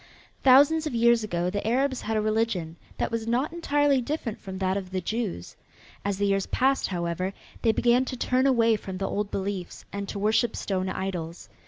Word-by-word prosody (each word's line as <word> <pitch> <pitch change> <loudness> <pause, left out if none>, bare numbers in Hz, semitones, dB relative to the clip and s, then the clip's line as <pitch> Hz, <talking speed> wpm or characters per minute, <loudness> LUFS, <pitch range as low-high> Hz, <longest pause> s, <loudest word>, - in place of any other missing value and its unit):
Thousands 290 +4 +6
of 290 - -4
years 235 0 +4
ago 175 -3 -1
the 205 +2 -3
Arabs 260 +2 +1
had 220 0 -1
a - - +2
religion 215 -7 -1 0.2
that - - -1
was 230 -1 -2
not 255 +7 0
entirely 290 -5 +2
different 245 -4 -3
from 190 -1 -7
that 190 0 0
of 195 -2 -4
the 185 0 -2
Jews. 195 - -4 0.5
As 200 -1 -1
the 205 - +1
years 195 -1 +1
passed, 270 +1 +1
however, 175 +1 -2 0.3
they 225 - +4
began 240 +3 +3
to 255 - -5
turn 255 +2 +2
away 230 -4 +4
from 190 -2 -7
the 195 +1 -2
old 205 0 -2
beliefs 195 -2 -4
and 200 0 -4
to - - -4
worship 220 +3 +1
stone 185 -1 -2
idols. 180 -3 -5
215 Hz, 195 wpm, -26 LUFS, 190-245 Hz, 0.5 s, Thousands